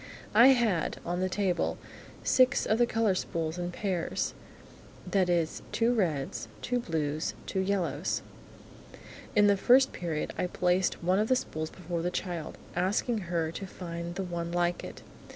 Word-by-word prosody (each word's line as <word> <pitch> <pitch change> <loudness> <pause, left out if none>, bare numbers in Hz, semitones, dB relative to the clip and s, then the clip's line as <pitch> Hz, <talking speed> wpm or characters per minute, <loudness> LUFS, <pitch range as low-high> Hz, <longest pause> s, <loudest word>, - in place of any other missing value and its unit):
I 235 +4 +8
had, 230 - +3
on 175 +1 -1
the 185 0 0
table, 185 -3 0 0.5
six 255 0 +4
of 220 - +2
the 240 - +5
colour 225 -4 +2
spools 165 -2 -2
in 175 0 -2
pairs, 180 -2 -2 0.7
that 190 -3 +1
is 170 -2 +1
two 235 +1 +2
reds, 160 - -1 0.2
two 245 0 0
blues, 155 -6 -2
two 190 - -2
yellows. 185 -5 0 1.1
In 205 -1 +6
the 200 0 +5
First 260 +6 +5
Period, 165 -3 -3
I 180 - +1
placed 180 0 +1
one 185 +3 +3
of 215 - +2
the 255 - +4
spools 155 -10 -3
before 175 -2 -4
the 175 - 0
child, 175 -3 -4 0.2
asking 205 +6 +1
her 165 -2 0
to 195 +3 -6
find 170 -1 -6
the 195 - -2
one 170 -2 -4
like 175 0 0
it. - - -9
180 Hz, 160 wpm, -29 LUFS, 170-205 Hz, 1.1 s, I